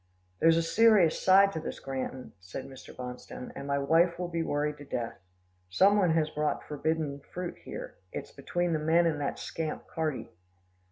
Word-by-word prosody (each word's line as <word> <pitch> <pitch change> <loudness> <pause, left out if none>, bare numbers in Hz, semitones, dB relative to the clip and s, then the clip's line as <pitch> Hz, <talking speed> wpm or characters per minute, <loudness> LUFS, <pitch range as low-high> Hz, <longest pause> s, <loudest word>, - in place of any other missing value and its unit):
"There's 165 0 +5
a 165 - +2
serious 205 -2 +5
side 195 +1 +6
to 160 - -3
this, 160 - -6
Granton," 130 -1 -5
said 90 +8 -7
Mr. 135 -1 -11
Bonstone, 125 0 -8
"and 140 0 -6
my 140 0 +1
wife 165 +5 +3
will 180 0 -3
be 165 -1 -1
worried 150 -1 -1
to - - -8
death. 120 -4 -4 0.5
Some 195 - +5
one 180 -5 +3
has 155 -1 +1
brought 150 0 -1
forbidden 150 -1 -2
fruit 180 0 -5
here. - - -7
It's - - -6
between 175 -1 -1
the 155 - +1
men 165 +3 +3
and 155 -3 0
that 140 - -2
scamp 160 -2 -4
Carty." 155 -4 -3
155 Hz, 180 wpm, -30 LUFS, 140-170 Hz, 0.5 s, side